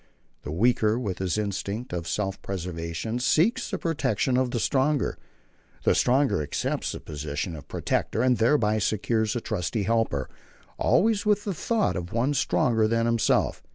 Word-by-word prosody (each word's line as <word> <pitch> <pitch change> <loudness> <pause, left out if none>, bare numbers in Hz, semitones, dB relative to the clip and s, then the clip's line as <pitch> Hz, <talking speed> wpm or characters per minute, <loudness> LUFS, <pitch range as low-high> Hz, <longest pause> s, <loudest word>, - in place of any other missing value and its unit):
The - - -6
weaker, 110 +4 +2
with 100 -8 -3
his 95 0 -1
instinct 105 +2 -3
of 85 -2 -3
self 95 +1 -2
preservation, 90 +4 -4
seeks 165 - +2
the 195 - -2
protection 155 -6 0
of 130 0 +2
the 120 - -2
stronger. 140 +3 +1 0.7
The - - +4
stronger 130 - +2
accepts 75 - -2
the - - -6
position 75 +3 -4
of 75 - -11
protector, 115 - -1
and 125 -2 +3
thereby 110 -3 +3
secures 110 +2 0
a 120 - -1
trusty 105 +1 -2
helper, 105 - 0 0.5
always 215 0 +3
with 210 -1 +3
the 200 - -2
thought 220 +6 0
of 90 -1 -5
one 120 +5 +1
stronger 115 -5 +2
than 115 +1 +1
himself. 115 -1 +1
115 Hz, 155 wpm, -26 LUFS, 95-130 Hz, 0.7 s, The